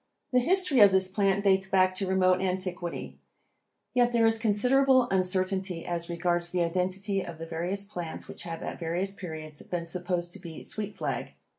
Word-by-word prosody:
The 250 - +6
history 350 0 +3
of 205 -2 +8
this 190 0 +3
plant 195 0 +1
dates 195 -1 +3
back 185 -1 +3
to 190 +1 -2
remote 185 -1 +3
antiquity, 180 -2 -3 0.7
yet 245 -1 +3
there 230 -1 +3
is 225 0 +3
considerable 250 +4 +4
uncertainty 185 -1 0
as 170 0 -2
regards 175 0 0
the 175 0 +1
identity 185 +3 -1
of 170 -3 -8
the 165 - -6
various 175 +5 -3
plants 175 -5 -6
which - - -8
have 165 -1 -6
at - - -5
various 175 +3 -1
periods 160 -6 -7
been 175 -2 -4
supposed 175 0 -2
to - - -8
be 165 -2 -9
sweet 215 -1 -5
flag. - - -4
185 Hz, 175 wpm, -28 LUFS, 175-200 Hz, 0.7 s, of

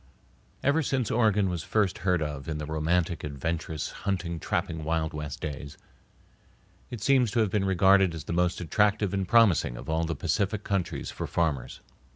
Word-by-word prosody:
Ever 145 +4 +3
since 130 -5 -1
Oregon 105 -4 +3
was 90 -3 -2
first 100 +2 0
heard 90 -4 +1
of 75 -1 -5
in 75 - -2
the 75 - -4
romantic, 80 +1 0
adventurous, 80 +1 -3
hunting, 90 -4 -2
trapping 85 -4 -2
Wild 80 0 -1
West 75 -2 -6
days, 70 -1 -6 1.1
it 115 -5 -6
seems 130 -3 +4
to 110 - 0
have 105 -4 +1
been 100 -1 +1
regarded 95 -1 +4
as 80 - -6
the 80 - -4
most 90 +1 +1
attractive 105 +3 +1
and 95 -2 -1
promising 100 - +4
of 80 - -6
all 80 +1 +1
the 80 0 -2
Pacific 100 +7 -1
countries 95 -4 -2
for - - -5
farmers. 80 -7 -1
90 Hz, 175 wpm, -28 LUFS, 80-100 Hz, 1.1 s, seems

